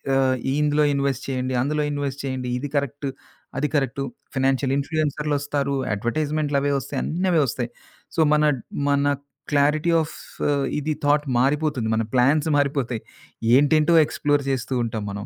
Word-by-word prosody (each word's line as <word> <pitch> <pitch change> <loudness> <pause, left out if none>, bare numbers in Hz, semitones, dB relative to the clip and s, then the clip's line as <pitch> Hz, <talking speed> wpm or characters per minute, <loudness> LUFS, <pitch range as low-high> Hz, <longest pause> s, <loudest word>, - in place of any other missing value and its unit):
ఆహ్, 130 -1 +3 0.3
ఇందులో 150 0 +3
ఇన్‌వెస్ట్ 140 -1 -1
చేయండి, 130 -1 -2
అందులో 150 +3 0
ఇన్‌వెస్ట్ 140 -1 -3
చేయండి, 130 -2 -3
ఇది 145 +3 -4
కరెక్ట్, 140 0 -1 0.5
అది 150 - +1
కరెక్టు, 135 -1 0 0.3
ఫినాన్సియల్ 135 0 +1
ఇన్‌ఫ్లుయెన్సర్లోస్తారు, 145 -1 -1 0.2
అడ్వర్టైజ్‌మెంట్లవి 145 +4 0
ఒస్తాయి, 130 - -4
అన్నవే 175 -1 +1
వస్తాయి. 120 0 -3 0.5
సో - - -2
మన 150 0 +3 0.5
మన 140 0 +2 0.5
క్లారిటీ 150 +3 +3
ఆఫ్ 160 - -6 0.6
ఇది 155 +1 -1
థాట్ 145 +1 +3
మారిపోతుంది. 140 -3 +1
మన 115 - +1
ప్లాన్స్ 140 +5 +3
మారిపోతాయి. 135 -5 0 0.5
ఏంటేంటో, 150 +4 +4
ఎక్స్‌ప్లోర్ 145 0 0
చేస్తూంటాం 120 -4 -1
మనం. 100 +1 -6
140 Hz, 125 wpm, -23 LUFS, 130-150 Hz, 0.6 s, ఏంటేంటో